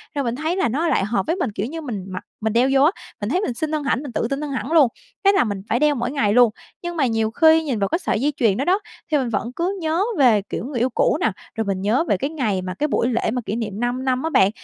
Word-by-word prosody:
Rồi 280 - 0
mình 235 0 -1
thấy 315 +5 -1
là 380 - +1
nó 310 +8 0
lại - - +2
hợp 235 +3 0
với 330 - +1
mình, 350 - -2
kiểu 205 - -3
như, 320 +6 -5
mình 215 -10 -5
mặc 185 -1 -6 0.2
mình 220 -1 0
đeo 245 +3 +3
vô 270 - +5
á, 315 - +5 0.3
mình 205 - -2
thấy 365 +7 +1
mình 250 - -2
xinh 310 +6 -3
hơn 305 -1 -1
hẳn, 275 -1 0
mình 280 - -6
tự 230 - -1
tin 275 +2 -2
hơn 295 - -4
hẳn 260 +1 -3
luôn, 310 -6 +6 0.4
thế 395 - +7
là 395 - +3
mình 200 -4 -3
phải 235 - +2
đeo 300 -1 +3
mỗi 245 +1 -2
ngày 220 -8 +1
luôn. 245 -1 +6 0.3
Nhưng 345 0 -5
mà 275 - +3
nhiều 225 -1 0
khi 320 +4 +5
nhìn 260 -8 -2
vào 195 - +1
cái 340 - 0
sợi 270 - -1
dây 295 +2 +1
chuyền 215 -5 +2
đó 275 - -1
đó, 375 +3 +3 0.3
thì 300 - +4
mình 255 -4 -1
vẫn 230 +2 -2
cứ 370 +4 -1
nhớ 320 +4 +1
về, 235 -7 +5
kiểu, - - -4
người 255 -3 -3
yêu 250 - +2
cũ 240 - +2
nè, 225 - +2 0.2
rồi 225 - -1
mình 195 -1 -2
nhớ 220 +9 +2
về - - +2
cái 275 - -2
ngày 220 -12 -1
mà 185 0 -4
cái 300 +10 -1
buổi 240 - +1
lễ 230 -2 0
mà 250 0 -2
kỷ 215 - -2
niệm 215 -3 -4
5 245 +2 -1
năm 255 +1 0
á 320 - 0
bạn, 190 -9 +4
255 Hz, 315 wpm, -22 LUFS, 225-305 Hz, 0.4 s, thế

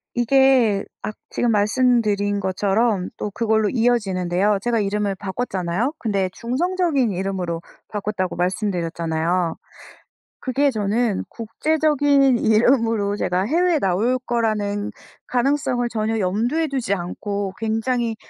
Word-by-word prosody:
이게 240 -4 +3 0.2
악 215 +1 -5 0.2
지금 240 - 0
말씀드린 210 -2 +2
것처럼 195 +1 0
또 210 - -4
그걸로 220 0 +1
이어지는데요. 200 -5 +1
제가 235 +1 0
이름을 205 -1 -1
바꿨잖아요. 195 - -2
근데 200 -7 -1
중성적인 285 - 0
이름으로 185 -3 -3 0.3
바꿨다고 205 -3 -3
말씀드렸잖아요. 170 -2 -1 0.8
그게 280 +2 +1
저는 215 -1 0
국제적인 285 +2 +2
이름으로 225 -2 +2
제가 180 -2 0
해외에 335 - +2
나올 215 +5 +1
거라는 210 -3 -1 0.4
가능성을 250 -1 +1
전혀 220 -1 -1
염두에 225 - 0
두지 265 -8 -2
않고 200 +2 -4
굉장히 225 +1 -1
215 Hz, 300 characters per minute, -22 LUFS, 195-245 Hz, 0.8 s, 이게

